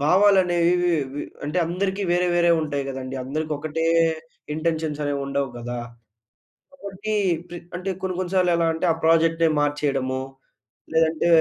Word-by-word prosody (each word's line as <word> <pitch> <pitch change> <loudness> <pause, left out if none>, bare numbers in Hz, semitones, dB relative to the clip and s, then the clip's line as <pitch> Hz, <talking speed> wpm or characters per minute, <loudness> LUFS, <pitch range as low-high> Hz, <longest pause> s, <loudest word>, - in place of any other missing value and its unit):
భావాలనేవి 180 -1 +4 0.4
వి 145 - -3 0.2
అంటే 150 +5 -1
అందరికి 190 +3 -2
వేరే, 180 +1 +2
వేరే 170 0 +4
ఉంటాయి 145 -2 -2
కదండీ. 135 0 -5
అందరికి 155 +3 -3
ఒకటే 155 +2 -2 0.7
ఇంటెన్షన్స్ 160 -2 -1
అనేవి 140 -1 -1
ఉండవు 140 -1 -1
కదా! 120 +1 -5 0.9
కాబట్టి 200 -4 -5 0.4
ప్ర 175 - -6 0.2
అంటే 185 +2 -3
కొన్ని 185 -1 -2
కొన్ని 185 0 -3
సార్లు 180 -1 +3
ఎలా 165 -1 +2
అంటే 170 +2 -1
ఆ! - - -2
ప్రాజెక్టే 165 0 +4
మార్చేయడము. 135 -3 0 0.7
లేదంటే 160 +1 +2
165 Hz, 135 wpm, -23 LUFS, 145-180 Hz, 0.9 s, భావాలనేవి